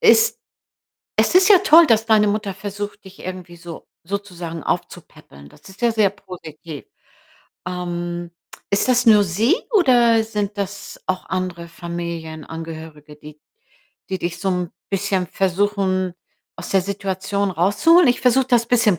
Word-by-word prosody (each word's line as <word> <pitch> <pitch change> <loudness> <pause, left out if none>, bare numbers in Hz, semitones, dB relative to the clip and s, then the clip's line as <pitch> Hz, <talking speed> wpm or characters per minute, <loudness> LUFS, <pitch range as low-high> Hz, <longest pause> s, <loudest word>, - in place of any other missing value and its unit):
es 450 +1 +5 0.8
es - - +2
ist 370 0 +6
ja 405 -3 +8
toll, 335 -3 +7
dass 225 -3 +3
deine 215 -2 +4
Mutter 205 -1 -2
versucht, 205 +1 -6
dich 190 0 -14
irgendwie 180 -1 -8
so 170 -1 -10 0.2
sozusagen 175 -4 -5
aufzupäppeln, 70 +1 -6
das - - -17
ist 190 +1 -15
ja 235 -1 +3
sehr 215 -3 +3
positiv. 165 -5 -10 0.8
Ähm, 175 -1 -4 0.4
ist 200 +5 +1
das 250 -1 +3
nur 215 -2 +7
sie 210 - +2 0.2
oder 240 - +4
sind 210 -2 -3
das 200 0 -5
auch 185 0 -2
andere 180 -2 -3
Familienangehörige, 160 -2 -7
die 150 0 -14 0.7
die 190 - -1
dich 175 0 -4
so 195 - -1
'n 180 -2 -2 0.2
bisschen 195 -2 0
versuchen, 190 -1 0 0.4
aus - - -8
der 195 - +3
Situation 200 +1 -2
rauszuholen? 205 - +4
Ich 245 - +2
versuche, 255 +1 +3
das 240 -2 +3
bisschen 225 -7 +3
195 Hz, 140 wpm, -21 LUFS, 175-215 Hz, 0.8 s, ja